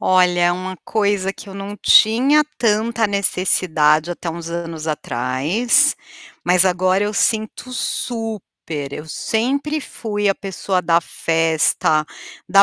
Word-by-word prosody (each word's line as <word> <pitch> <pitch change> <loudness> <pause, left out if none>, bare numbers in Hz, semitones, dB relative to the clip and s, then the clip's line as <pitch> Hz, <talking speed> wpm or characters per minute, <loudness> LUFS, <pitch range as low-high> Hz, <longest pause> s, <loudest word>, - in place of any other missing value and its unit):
Olha, 180 -1 +3
uma 185 +1 -5
coisa 200 -3 0
que 200 - -12
eu 195 - -10
não 200 +1 -7
tinha 265 +10 +5
tanta 225 0 +1
necessidade 175 -5 +1
até 175 0 -5
uns 170 0 -7
anos 165 -2 -5
atrás, 145 - +1 0.5
mas 180 +1 +4
agora 185 +2 +2
eu 210 - -3
sinto 220 +4 -1
super, 215 - -4
eu 150 - -7
sempre 280 - -1
fui 205 -6 -3
a 195 - +2
pessoa 190 -1 -3
da 170 -1 +3
festa, 160 -2 +1 0.4
da 195 0 +7
185 Hz, 125 wpm, -19 LUFS, 165-215 Hz, 0.5 s, da